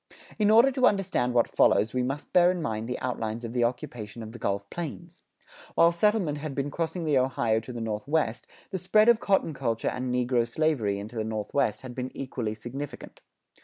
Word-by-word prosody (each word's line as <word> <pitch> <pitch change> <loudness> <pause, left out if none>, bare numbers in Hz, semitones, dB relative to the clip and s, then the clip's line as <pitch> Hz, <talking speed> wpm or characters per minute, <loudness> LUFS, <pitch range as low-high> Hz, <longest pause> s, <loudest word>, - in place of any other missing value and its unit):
In 210 -1 +4
order 230 +5 +6
to 255 -1 +4
understand 180 -12 0
what 120 - +4
follows, 110 - +4
we 130 - +1
must 135 +4 -4
bear 175 0 +6
in 180 -1 0
mind 115 -6 -3
the 125 - -2
outlines 115 -2 -3
of 115 - -6
the 120 -1 +1
occupation 120 -2 -4
of 110 - -8
the 120 - -10
Gulf 100 -1 -2
Plains. 170 +1 -7 0.5
While 170 0 +6
settlement 170 -4 +1
had 145 -2 -5
been 140 +1 -2
crossing 165 +2 -3
the 145 -4 +3
Ohio 120 -4 +1
to 115 +3 -9
the 120 -1 -5
Northwest, 115 +3 -1 0.2
the 190 - -2
spread 215 +5 +4
of 235 -2 +5
cotton 195 -7 +1
culture 115 -5 -1
and 125 0 -3
negro 125 -1 +1
slavery 120 -7 0
into 105 +4 -7
the 110 0 -2
Southwest 110 +3 -1
had 130 -1 -8
been 125 +1 -4
equally 120 -5 -3
significant. 130 +6 -8
130 Hz, 200 wpm, -27 LUFS, 115-165 Hz, 0.5 s, order